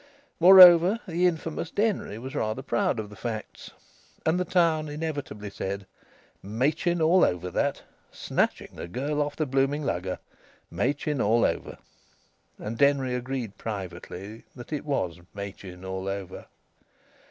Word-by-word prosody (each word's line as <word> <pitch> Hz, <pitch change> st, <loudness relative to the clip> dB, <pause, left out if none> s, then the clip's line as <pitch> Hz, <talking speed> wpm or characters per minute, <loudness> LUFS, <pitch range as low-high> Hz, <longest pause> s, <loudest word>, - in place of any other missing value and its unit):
Moreover, 180 Hz, +2 st, +9 dB
the 175 Hz, +1 st, +2 dB
infamous 165 Hz, -1 st, -3 dB
Denry 205 Hz, -, -1 dB
was 130 Hz, +3 st, -7 dB
rather 110 Hz, -6 st, -2 dB
proud 120 Hz, -, 0 dB
of 105 Hz, -1 st, -6 dB
the -, -, -10 dB
facts. 110 Hz, -2 st, -6 dB, 0.6 s
And 160 Hz, +3 st, +2 dB
the 180 Hz, -, 0 dB
town 160 Hz, -3 st, +2 dB
inevitably 145 Hz, -9 st, -5 dB
said: 100 Hz, 0 st, -4 dB, 0.6 s
"Machin 150 Hz, -, 0 dB
all 175 Hz, +3 st, +5 dB
over, 90 Hz, 0 st, 0 dB
that! -, -, -1 dB, 0.3 s
Snatching -, -, -1 dB
the -, -, -7 dB
girl 145 Hz, -, -2 dB
off 145 Hz, 0 st, -2 dB
the 155 Hz, -, -1 dB
blooming 135 Hz, +2 st, 0 dB
lugger. 90 Hz, -1 st, -2 dB, 0.5 s
Machin 145 Hz, -1 st, -1 dB
all 115 Hz, +3 st, +3 dB
over." -, -, -2 dB, 0.8 s
And 110 Hz, +2 st, -6 dB
Denry 140 Hz, -2 st, +3 dB
agreed 125 Hz, -4 st, -4 dB
privately 100 Hz, +1 st, -7 dB
that 125 Hz, +4 st, -9 dB
it 150 Hz, -, -3 dB
was 90 Hz, -, -2 dB
Machin 95 Hz, -2 st, -8 dB
all 95 Hz, 0 st, -4 dB
over. 95 Hz, -1 st, -5 dB
130 Hz, 135 wpm, -27 LUFS, 100-160 Hz, 0.8 s, Moreover